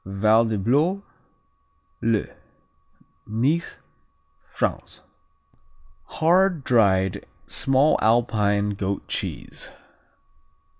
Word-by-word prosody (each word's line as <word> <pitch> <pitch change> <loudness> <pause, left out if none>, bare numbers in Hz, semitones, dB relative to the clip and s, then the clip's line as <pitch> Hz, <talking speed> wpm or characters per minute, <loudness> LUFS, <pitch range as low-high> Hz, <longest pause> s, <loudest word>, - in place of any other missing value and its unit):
Valdeblore, 110 - +1 1.0
le 115 -2 +1 1.0
Nice, 135 +10 -1 0.7
France - - -4 1.0
Hard, 175 0 +2
dried, 95 -7 +2 0.2
small 135 +3 +2
Alpine 105 -3 +1
goat 100 -1 -4
cheese. - - -5
115 Hz, 55 wpm, -23 LUFS, 100-145 Hz, 1.0 s, Hard